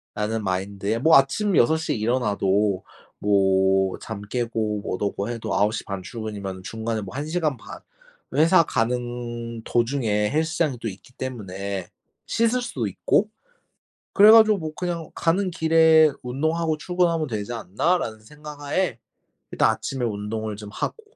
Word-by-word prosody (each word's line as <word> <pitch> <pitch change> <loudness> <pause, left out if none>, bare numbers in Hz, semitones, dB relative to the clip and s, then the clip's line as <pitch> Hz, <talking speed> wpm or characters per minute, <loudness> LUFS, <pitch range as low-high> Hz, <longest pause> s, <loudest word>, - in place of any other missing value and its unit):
라는 110 +1 -2
마인드에 100 +3 -2
뭐 160 +6 +6
아침 160 +9 +1
6 160 +7 +4
시에 160 - -2
일어나도 105 -4 +1 0.3
뭐 95 -1 +3 0.3
잠 110 -2 -7
깨고 110 -1 -2
뭣 95 - -3
허고 100 0 -2
해도 110 -4 -3
9 105 +2 +2
시 - - -4
반 100 -2 -5
출근이면은 100 -3 -6
중간에 110 +2 -3
뭐 100 +1 -8
1 145 +2 -3
시간 155 -3 -1
반 115 - -10 0.6
회사 165 +3 +5
가는 120 -2 -3
도중에 115 -4 0
헬스장이 160 -2 0
또 115 - -3
있기 105 +6 -11
때문에 100 -7 -5 0.4
씻을 230 +2 +1
수도 125 - -3
있고 195 - +1 0.8
그래 210 +1 +8
가지고 220 -2 +7
뭐 155 -3 -5
'그냥 170 -3 -4
가는 185 +3 +1
길에 160 -2 +5
운동하고 160 +5 -1
출근하면 170 -2 0
되지 110 -1 -4
않나?'라는 115 - -1
생각 150 +6 -11
하에 145 -3 -1 0.5
일단 - - +3
아침에 130 -2 -3
운동을 110 0 -3
좀 105 0 -9
하고 450 - -4
120 Hz, 290 characters per minute, -24 LUFS, 105-160 Hz, 0.8 s, 그래